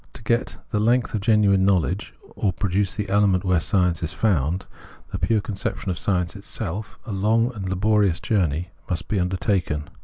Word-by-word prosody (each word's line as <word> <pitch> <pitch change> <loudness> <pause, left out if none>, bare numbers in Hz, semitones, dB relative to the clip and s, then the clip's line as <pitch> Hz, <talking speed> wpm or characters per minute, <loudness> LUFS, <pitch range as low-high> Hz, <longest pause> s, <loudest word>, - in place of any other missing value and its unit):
To - - -11
get 115 +2 0
the 105 - +1
length 120 +3 +2
of 110 - -1
genuine 100 -3 +4
knowledge, 95 0 +1 0.2
or 100 - +1
produce 95 +1 -1
the 105 -2 -3
element 95 -2 +3
where 90 -3 +3
science 90 0 +1
is 80 -2 -2
found 85 0 +1 0.2
— - - -23
the - - -3
pure 110 -2 +2
conception 100 -1 -3
of 85 - -3
science 90 -2 0
itself 100 0 -5
— - - -33
a 115 - -6
long 110 +5 +2
and 95 -4 -5
laborious 100 -1 +2
journey 90 - 0 0.2
must 85 -2 -2
be 105 - 0
undertaken. 90 -4 -1
95 Hz, 185 wpm, -23 LUFS, 90-105 Hz, 0.2 s, genuine